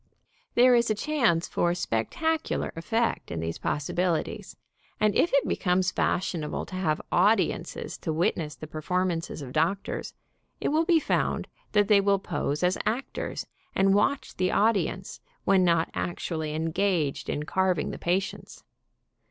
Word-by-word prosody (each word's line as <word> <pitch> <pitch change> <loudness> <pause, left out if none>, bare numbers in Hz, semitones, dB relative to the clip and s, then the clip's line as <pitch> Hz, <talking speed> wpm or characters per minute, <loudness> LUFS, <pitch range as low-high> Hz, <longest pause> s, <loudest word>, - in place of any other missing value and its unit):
There 250 +1 +6
is 235 -1 +3
a 215 - +2
chance 230 - +1
for 175 0 +1
spec 115 -10 -1
tacular 320 0 -1
effect 225 +8 -1
in 85 - -4
these 80 0 -3
possibilities, 165 +3 -2 0.4
and 215 -1 +3
if 345 - +3
it 280 - +3
becomes 180 0 +1
fashionable 165 -4 -1
to 185 - -8
have 160 -5 0
audiences - - +1
to - - -3
witness 155 -2 0
the 130 - -8
perform 180 +5 -1
ances 165 -3 -4
of 130 -1 -8
doctors, 170 +6 -1 0.4
it - - 0
will 315 +2 +2
be 335 -1 +4
found - - 0 0.3
that 205 -1 +4
they 205 -2 +6
will 200 0 +3
pose 150 -4 -2
as 180 +1 +2
actors, 250 +5 -3 0.3
and 195 0 +4
watch 275 +7 +1
the 185 0 +1
audience 215 -1 +1 0.3
when 190 -1 +4
not 170 -2 +2
actually 160 -3 -3
engaged 165 -2 0
in 150 - -2
carving 185 0 0
the - - -7
patients. 190 +3 -2
185 Hz, 150 wpm, -27 LUFS, 160-210 Hz, 0.4 s, There